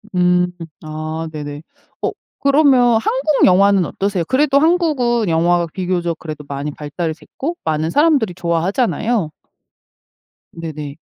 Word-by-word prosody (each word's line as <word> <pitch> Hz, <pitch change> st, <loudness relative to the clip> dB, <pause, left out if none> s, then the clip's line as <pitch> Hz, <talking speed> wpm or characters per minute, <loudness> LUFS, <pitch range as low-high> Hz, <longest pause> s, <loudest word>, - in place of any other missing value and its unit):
음. 180 Hz, 0 st, +3 dB, 0.4 s
아 155 Hz, +1 st, -5 dB
네네. 145 Hz, -1 st, -6 dB, 0.4 s
어 -, -, 0 dB, 0.3 s
그러면 270 Hz, -5 st, +4 dB
한국 270 Hz, +5 st, +2 dB
영화는 195 Hz, 0 st, +4 dB
어떠세요? 195 Hz, +1 st, -2 dB
그래도 280 Hz, +1 st, +3 dB
한국은 290 Hz, -, +2 dB
영화가 170 Hz, +1 st, +2 dB
비교적 175 Hz, -3 st, -2 dB
그래도 155 Hz, -2 st, -7 dB
많이 140 Hz, +1 st, -4 dB
발달이 150 Hz, +3 st, -4 dB
됐고 295 Hz, -, -6 dB
많은 155 Hz, 0 st, -1 dB
사람들이 285 Hz, -, +2 dB
좋아하잖아요. 190 Hz, -, 0 dB, 1.2 s
네네. 155 Hz, -3 st, -7 dB
180 Hz, 285 characters per minute, -18 LUFS, 160-245 Hz, 1.2 s, 그러면